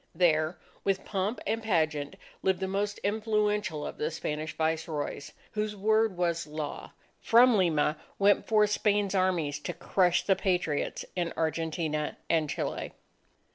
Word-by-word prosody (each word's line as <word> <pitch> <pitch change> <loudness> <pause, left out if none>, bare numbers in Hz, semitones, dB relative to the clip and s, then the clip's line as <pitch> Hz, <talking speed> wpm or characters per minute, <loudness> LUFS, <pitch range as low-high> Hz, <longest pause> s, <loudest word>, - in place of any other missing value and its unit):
There, 160 -1 +2 0.3
with 195 -1 0
pomp 200 +3 -1
and 225 +2 -1
pageant, 155 -8 0 0.3
lived 190 -2 +1
the 190 - -1
most 200 +2 -1
influential 210 -6 0
of - - -7
the 150 - 0
Spanish 155 +1 -4
Viceroys, 160 -2 -2 0.2
whose 210 0 -2
word 215 -1 +2
was 170 -2 0
law. 150 -1 -6 0.3
From 240 +1 +6
Lima 160 -5 +2 0.2
went 200 +1 +3
forth 210 -2 +4
Spain's 205 -2 +1
armies 175 -6 +1
to 150 - -4
crush 180 -2 +2
the 195 - +3
Patriots 180 -7 -1
in 175 -2 -1
Argentina 160 -1 -1
and 160 -3 +2
Chile. - - -3
180 Hz, 135 wpm, -29 LUFS, 155-205 Hz, 0.3 s, From